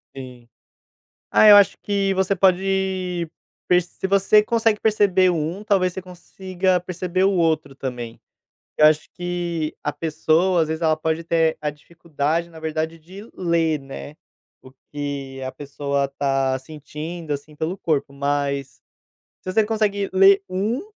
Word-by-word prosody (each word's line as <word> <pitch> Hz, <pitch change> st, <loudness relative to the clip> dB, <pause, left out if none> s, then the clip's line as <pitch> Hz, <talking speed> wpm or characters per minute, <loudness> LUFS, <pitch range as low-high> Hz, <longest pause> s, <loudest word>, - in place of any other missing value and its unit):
Sim. 125 Hz, -3 st, -10 dB, 0.8 s
Ah, -, -, +5 dB
eu 205 Hz, -, +10 dB
acho 200 Hz, -, +5 dB
que 200 Hz, -1 st, 0 dB
você 190 Hz, +1 st, +1 dB
pode 185 Hz, -2 st, 0 dB, 0.4 s
perce 180 Hz, -1 st, +3 dB
se -, -, -3 dB
você 195 Hz, +2 st, +4 dB
consegue 225 Hz, -1 st, +1 dB
perceber 200 Hz, -4 st, +3 dB
um, 170 Hz, +4 st, -3 dB
talvez 195 Hz, -4 st, +1 dB
você 190 Hz, -, -6 dB
consiga 185 Hz, 0 st, -2 dB
perceber 185 Hz, +1 st, -2 dB
o 195 Hz, -, +3 dB
outro 160 Hz, -5 st, 0 dB
também. 125 Hz, -4 st, -6 dB, 0.6 s
Eu 150 Hz, -, +6 dB
acho 155 Hz, 0 st, +3 dB
que 175 Hz, -3 st, -3 dB
a 150 Hz, -, -1 dB
pessoa, 165 Hz, +4 st, +1 dB
às 160 Hz, -, 0 dB
vezes, 160 Hz, +1 st, -4 dB
ela 160 Hz, -1 st, +3 dB
pode 160 Hz, +1 st, -2 dB
ter 165 Hz, -1 st, +1 dB
a 150 Hz, -, -1 dB
dificuldade 160 Hz, +1 st, -3 dB
na 160 Hz, -1 st, -12 dB
verdade 160 Hz, +1 st, -3 dB
de 190 Hz, +7 st, -12 dB
ler, 165 Hz, -3 st, 0 dB
né, 135 Hz, +2 st, -9 dB, 0.5 s
o 130 Hz, -, -15 dB, 0.2 s
que 140 Hz, -2 st, -5 dB
a 130 Hz, 0 st, -4 dB
pessoa 140 Hz, 0 st, -3 dB
está 135 Hz, -1 st, -1 dB
sentindo 155 Hz, +3 st, -8 dB
assim 145 Hz, +2 st, -8 dB
pelo 160 Hz, +5 st, -3 dB
corpo, 145 Hz, -6 st, -1 dB
mas, 140 Hz, -1 st, -2 dB, 0.6 s
se 185 Hz, -, -5 dB
você 220 Hz, +2 st, +3 dB
consegue 210 Hz, -2 st, -1 dB
ler 195 Hz, +1 st, +6 dB
um, 210 Hz, -, -1 dB
170 Hz, 150 wpm, -22 LUFS, 145-190 Hz, 0.8 s, eu